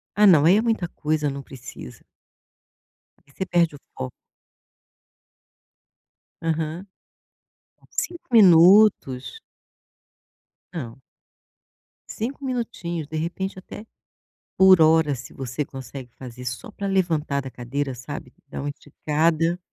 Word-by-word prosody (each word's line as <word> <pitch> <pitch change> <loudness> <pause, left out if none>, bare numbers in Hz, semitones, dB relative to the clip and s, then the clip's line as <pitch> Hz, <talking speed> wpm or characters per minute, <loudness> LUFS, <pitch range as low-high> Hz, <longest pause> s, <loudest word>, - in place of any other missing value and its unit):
Ah 210 0 +6
não, 155 -6 +6
aí 185 +5 +6
é - - +3
muita 225 -6 0
coisa, 150 -2 -1
não 140 0 -5
precisa. 125 - -11 1.2
Porque 140 - -26
você 190 - -4
perde 170 -4 +1
o - - -13 0.2
foco. 65 - -5 2.3
Aham. 165 +2 -2 1.2
5 345 -1 -7
minutos. 180 - +5 1.3
Não. 130 -6 -7 1.1
5 260 +6 -5
minutinhos, 225 - -4
de 160 - -8
repente 185 +4 -4
até, 210 +3 -10 0.7
por 190 -2 +7
hora 160 -2 +4
se 130 0 -11
você 135 +2 -4
consegue 135 -2 -9
fazer 125 -1 -10
só 125 - -5
para 200 -1 -5
levantar 160 -7 0
da 135 - -7
cadeira 130 +2 -4
sabe, 125 +1 -8
dar - - -6
uma 145 - -3
esticada. 160 +4 -1
160 Hz, 115 wpm, -23 LUFS, 135-185 Hz, 2.3 s, por